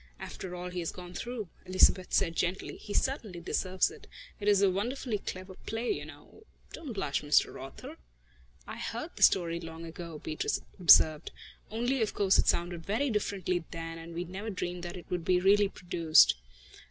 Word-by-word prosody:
"After 180 -1 -7
all 180 0 -6
he 180 - -4
has 165 - -2
gone 180 -1 -10
through," 235 +1 -5 0.2
Elizabeth 185 0 +4
said 165 -4 +2
gently, 180 +3 -2
"he 205 - -10
certainly 215 -8 -1
deserves 185 - 0
it. 445 - -14 0.3
It 205 - -4
is 200 -1 +5
a 195 - +5
wonderfully 230 +3 -2
clever 185 0 -7
play, 225 +2 -1
you 145 - -3
know... 155 - -14 0.3
don't 300 -7 -6
blush, 190 -9 -1
Mr. 150 0 +2
Author!" - - -9 0.7
"I - - -7
heard - - -5
the - - -11
story 170 -2 +4
long 165 0 -8
ago," 165 -1 -8
Beatrice 155 +1 -2 0.2
observed, 155 -3 +6 0.4
"only 240 +4 0
of 220 - 0
course 195 -2 +3
it - - +3
sounded 175 -1 0
very 235 +9 0
differently 190 -4 -1
then, 165 -1 -6
and 165 0 -9
we 175 - -2
never 190 +5 -6
dreamed 180 -3 -4
that 175 +1 -6
it 175 - -10
would 175 -2 -2
really 195 +3 +5
be - - -12
produced." 170 -4 +4
180 Hz, 180 wpm, -30 LUFS, 170-205 Hz, 0.7 s, observed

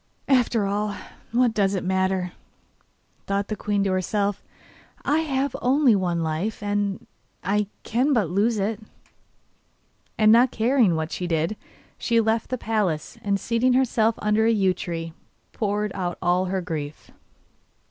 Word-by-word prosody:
'After 245 -5 +3
all, 205 +1 -1 0.4
what 240 0 +3
does 200 -2 +1
it 185 - -2
matter?' 190 -1 0 1.0
thought 200 0 -1
the 215 - -1
queen 205 -1 -1
to 195 - 0
herself, 200 +2 0 0.6
'I 295 +3 +3
have 280 -3 -1
only 260 -2 +4
one 175 -3 0
life, 165 +8 -2
and 205 -1 -1 0.4
I 205 +1 +1 0.2
can 255 +6 +1
but 225 -9 +2
lose 205 +7 +1
it.' 205 +1 -1 1.4
And 215 -1 +5
not 240 +3 +6
caring 230 -6 +2
what 160 0 -3
she 180 - -3
did, 165 +4 0 0.4
she 230 -1 +2
left 225 0 +1
the 255 - -1
palace 210 -10 -2
and 200 -1 0
seating 235 +5 +1
herself 230 -3 +2
under 210 +1 +2
a - - +4
yew 195 -4 +3
tree, 165 -2 -5 0.4
poured 210 -1 -1
out 175 -2 -3
all 180 +1 +2
her 190 0 -1
grief. 155 -4 -6
205 Hz, 145 wpm, -24 LUFS, 185-230 Hz, 1.4 s, not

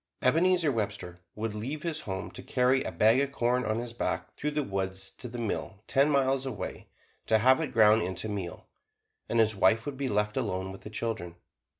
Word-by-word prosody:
Ebenezer 165 +3 +4
Webster 100 -6 -3 0.2
would 110 0 -3
leave 130 +8 -4
his 165 -3 -2
home 95 -7 -5
to - - -8
carry 130 +1 +2
a - - -3
bag 110 +4 +4
of 140 0 -1
corn 125 -1 +1
on 110 0 0
his 120 0 -5
back 120 - -3
through 150 - -2
the 150 0 -1
woods 95 -3 -3
to 125 - -7
the 120 +1 -7
mill 110 -2 -3
ten 140 +2 +3
miles 135 -2 +2
away 130 -7 -5 0.4
to 110 - +5
have 130 +5 +5
it 155 - -3
ground 110 0 +6
into 95 +3 -3
meal, 100 -4 -5 0.6
and 115 - +1
his 110 -1 +4
wife 110 +4 +3
would 145 -2 -5
be 135 -1 -1
left 105 0 0
alone 95 -6 -2
with 95 - -10
the - - -8
children. 110 -6 -4
115 Hz, 205 wpm, -29 LUFS, 105-135 Hz, 0.6 s, ground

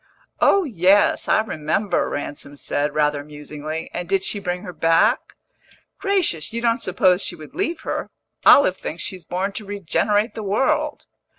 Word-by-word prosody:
"Oh 395 - +4
yes, 200 - +3
I - - +4
remember," 185 0 -1
Ransom 145 0 -6
said, 145 +1 -2
rather 150 -1 +1
musingly. 150 +2 -7
"And 175 0 -5
did 195 -1 +1
she 205 - -1
bring 180 -2 -3
her 180 - -7
back?" 165 +1 +2 0.6
"Gracious, 365 - 0
you 230 - -3
don't 235 +1 +1
suppose 185 -3 +2
she - - -1
would 155 -2 -12
leave 345 -3 -2
her! - - -4 0.3
Olive 190 -10 +6
thinks 165 +2 -5
she's 185 -2 -5
born 185 +3 -2
to 215 - -7
regenerate 205 +3 0
the 220 - -6
world." 295 +9 0
185 Hz, 160 wpm, -22 LUFS, 155-220 Hz, 0.6 s, Olive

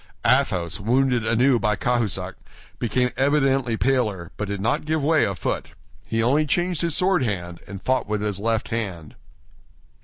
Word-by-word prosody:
Athos, 100 - +2
wounded 125 +2 +1
anew 120 +2 +3
by 105 -1 +1
Cahusac, 120 -1 -1 0.5
became 125 +1 0
evidently 135 -4 +2
paler, 110 -10 0
but 105 - -4
did 100 0 -3
not 110 +4 0
give 155 -1 0
way 155 +2 +3
a 100 - -2
foot. 80 - -3 0.3
He 115 0 0
only 145 +6 +2
changed 175 +1 0
his 170 -3 +1
sword 185 -1 +3
hand, 90 -7 -3
and 95 -1 -8
fought 130 -4 0
with 105 0 -2
his 105 -2 -2
left 115 +1 -1
hand. 95 -9 -4
115 Hz, 160 wpm, -23 LUFS, 100-135 Hz, 0.5 s, anew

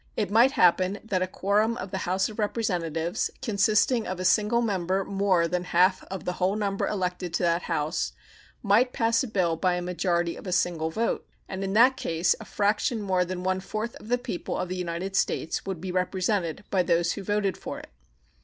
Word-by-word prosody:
It 205 -3 -1
might 240 +6 +5
happen 185 0 +3
that 190 -4 -1
a 185 - +1
quorum 210 +5 +1
of 185 0 -6
the 190 - -2
House 190 +1 +2
of 215 - -9
Representatives, 175 -7 -1
consisting 215 +3 +2
of 185 0 -4
a 185 - -3
single 210 +5 +3
member 190 -2 0
more 195 -4 +2
than 180 +1 -2
half 180 +2 +3
of 190 -3 -7
the 180 - 0
whole 190 +3 +2
number 200 -2 -1
elected 180 -3 -2
to - - 0
that 170 0 +2
House, 150 +1 -1 0.5
might 230 +5 +3
pass 230 0 +2
a - - -3
bill 185 -6 +1
by 180 +1 +1
a 180 - -2
majority 175 -1 0
of - - -10
a - - -3
single 175 -3 +1
vote, 225 +8 -2 0.2
and 190 0 -5
in 195 0 -2
that 250 +5 +5
case 165 -4 +1
a - - -9
fraction 210 +3 0
more 190 -3 +1
than 180 0 -5
one 185 0 0
fourth 215 +4 -4
of - - -14
the 245 +2 +2
people 245 -7 -4
of 180 - -3
the 185 - -3
United 180 +2 -4
States 190 - -1
would 190 -4 -3
be 185 +2 -5
represented 185 0 -1
by 190 - +3
those 170 -1 +2
who - - -4
voted 200 -1 0
for - - -6
it. - - -11
190 Hz, 210 wpm, -26 LUFS, 180-210 Hz, 0.5 s, might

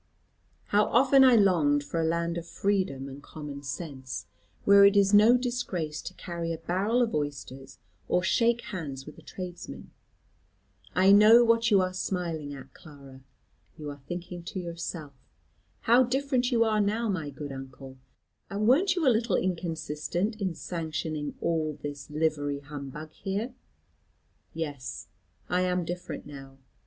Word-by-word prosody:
How 205 +1 +4
often 265 +2 +5
I 255 -2 +7
longed 165 -9 +3
for 165 +3 -2
a 160 - +1
land 170 +1 0
of 170 - -11
freedom 185 -9 -1
and 135 +1 -9
common 145 -2 -8
sense, 135 -2 -6 0.4
where 200 0 +8
it 200 +1 +6
is 200 0 +4
no 220 +4 +7
disgrace 215 -12 -3
to 185 - -8
carry 170 -2 -4
a 165 - -3
barrel 200 +9 +1
of 225 - -2
oysters, 135 -2 -5 0.3
or 180 - +1
shake 235 +4 +2
hands 150 -10 -6
with 150 - -11
a - - -14
tradesman. 180 -2 -8 1.0
I 190 +2 +5
know 215 +4 +8
what 230 0 +3
you 200 -3 +5
are 185 0 -1
smiling 170 -6 -3
at, 135 -1 -12
Clara. 140 -3 -14 0.6
You 150 -2 -6
are 145 -1 -11
thinking 175 0 -6
to 190 - -5
yourself, 170 -4 -6 0.7
'how 240 +3 +5
different 260 0 0
you 230 -2 +4
are 215 -2 +2
now, 215 +3 0
my 170 -8 -2
good 145 0 -7
uncle; 135 0 -9 0.5
and 205 +2 -1
wern't 345 +9 +4
you 335 -6 +1
a 250 - +6
little 230 +2 +1
inconsistent 175 +2 -2
in 185 -4 -1
sanctioning 155 -3 -4
all 160 -2 0
this 145 -1 -7
livery 150 -2 -1
humbug 145 +1 -8
here?' 205 +9 -4 1.0
Yes, 145 -6 -6 0.4
I 180 +1 +1
am 180 -1 0
different 175 +1 -6
now. 135 -2 -11
170 Hz, 150 wpm, -28 LUFS, 145-205 Hz, 1.0 s, where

